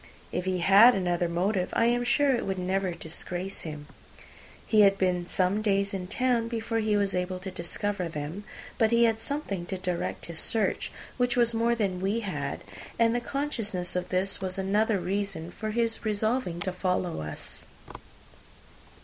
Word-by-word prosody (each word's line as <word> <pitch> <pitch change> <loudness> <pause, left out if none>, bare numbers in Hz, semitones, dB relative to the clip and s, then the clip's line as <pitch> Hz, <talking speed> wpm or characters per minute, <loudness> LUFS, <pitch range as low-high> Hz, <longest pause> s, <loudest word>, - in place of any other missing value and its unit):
If 180 - -2
he 185 -1 0
had 215 +6 +8
another 175 -2 0
motive, 185 +2 0
I 230 - +3
am 240 +1 +2
sure 270 +3 +3
it 235 - -2
would 190 -1 -2
never 190 +1 0
disgrace 175 +3 -6
him. 150 -2 -7 0.8
He 215 -1 +5
had 195 -1 +6
been 180 -2 +1
some 190 +4 +1
days 200 -1 +1
in 185 -2 -3
town 245 +2 +1
before 225 0 -2
he 215 -1 +2
was 200 -1 +1
able 180 0 -1
to 190 +1 -6
discover 185 +1 -3
them; 155 +5 -5 0.4
but 225 -2 +4
he 235 +1 +4
had 225 -1 +2
something 225 - -3
to 190 - -3
direct 180 -2 -3
his 170 -1 -3
search, 225 -2 +1 0.3
which 245 -1 +1
was 235 -1 +3
more 230 +1 +2
than 195 -5 -1
we 200 +4 0
had; 150 -9 -4 0.3
and 230 0 +4
the 240 - +1
consciousness 230 -11 -2
of 180 0 -2
this 190 +1 +1
was 185 -1 -2
another 205 +3 +2
reason 185 -2 -3
for 215 +3 -5
his 230 +1 -1
resolving 215 -3 0
to 185 - -1
follow 180 - -1
us. 75 0 -6
195 Hz, 175 wpm, -28 LUFS, 180-225 Hz, 0.8 s, had